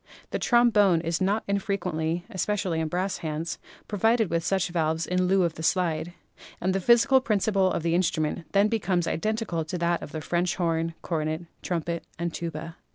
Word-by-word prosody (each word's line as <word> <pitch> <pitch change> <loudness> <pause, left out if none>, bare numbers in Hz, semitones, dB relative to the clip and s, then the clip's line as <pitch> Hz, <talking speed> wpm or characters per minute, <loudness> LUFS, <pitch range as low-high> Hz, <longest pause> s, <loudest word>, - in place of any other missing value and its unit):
The - - -1
trombone 215 -7 +4
is 165 +2 -2
not 200 +4 +1
infrequently 180 -4 -1
(especially 190 -3 -1
in 160 - 0
brass 185 +4 -2
bands) 160 +1 -4 0.3
provided 220 0 +2
with 170 0 0
such 190 0 +1
valves 160 -1 0
in 180 0 +1
lieu 190 0 +3
of 170 -2 0
the 160 - -8
slide, 175 0 0 0.5
and 185 +1 0
the 195 - +1
physical 245 +5 +5
principle 200 -4 +2
of - - -2
the 165 0 +1
instrument 165 -2 0
then 200 +1 +5
becomes 190 -6 0
identical 215 +1 -1
with 160 - -3
that 170 0 +1
of - - -8
the 160 - -4
French 175 +3 0
horn, 165 -2 -1
cornet, 155 -1 -2 0.2
trumpet 170 -1 -2
and 170 0 -3
tuba. 165 0 -5
175 Hz, 175 wpm, -26 LUFS, 165-200 Hz, 0.5 s, physical